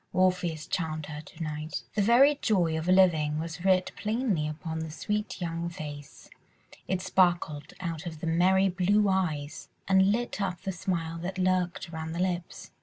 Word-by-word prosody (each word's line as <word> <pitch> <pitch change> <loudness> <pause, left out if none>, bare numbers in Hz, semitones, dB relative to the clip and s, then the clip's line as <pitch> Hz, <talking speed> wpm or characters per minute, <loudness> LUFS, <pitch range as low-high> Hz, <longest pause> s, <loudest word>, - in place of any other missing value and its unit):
Orpheus 180 -3 +1
charmed 155 -3 -2
her 150 0 -7
to 160 - -9
night. 155 0 -4
The 210 - +1
very 265 +7 +5
joy 175 -7 +2
of 160 +2 -3
living 170 -5 +4
was 165 +2 -5
writ 185 -1 +3
plainly 215 -8 0
upon 160 +1 -5
the 160 0 -4
sweet 210 +8 -3
young 170 -1 -3
face, 145 -3 -9 0.6
it 185 0 -1
sparkled 175 -5 +1
out 170 -2 -4
of 160 -2 -7
the 165 - -5
merry 185 +4 +4
blue 195 +3 +2
eyes 160 -7 -1 0.2
and 190 +1 +5
lit 240 -1 -2
up 185 -3 -2
the 195 - -2
smile 165 -3 -3
that 185 +3 -5
lurked 180 -2 0
around 160 0 -4
the 170 - -4
lips. 180 -1 -3
175 Hz, 170 wpm, -28 LUFS, 160-190 Hz, 0.6 s, very